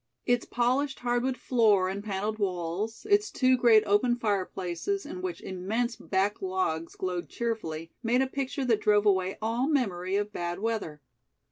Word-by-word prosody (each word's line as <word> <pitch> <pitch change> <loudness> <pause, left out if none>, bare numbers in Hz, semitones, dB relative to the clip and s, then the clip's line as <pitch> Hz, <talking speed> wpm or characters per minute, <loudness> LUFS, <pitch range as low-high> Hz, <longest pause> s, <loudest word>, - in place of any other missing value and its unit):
Its 245 -1 +1
polished 260 +4 0
hardwood 245 +1 0
floor 215 -7 +3
and 195 +2 -4
paneled 210 +1 -3
walls, 190 - -2
its 415 0 +3
two 255 -1 +3
great 235 -3 +5
open 210 +4 +3
fireplaces, 200 - -2
in 350 +5 -6
which 370 -2 -4
immense 220 +6 -2
back 200 +1 -1
logs 185 -4 -2
glowed 180 -2 -3
cheerfully, 165 -9 -3
made 245 +2 +2
a - - +1
picture 270 0 -3
that 225 -4 +2
drove 210 0 +3
away 190 -2 +2
all 235 +4 0
memory 195 - 0
of 205 +1 -1
bad 175 0 -3
weather. 200 -8 -3
215 Hz, 155 wpm, -28 LUFS, 190-245 Hz, -, great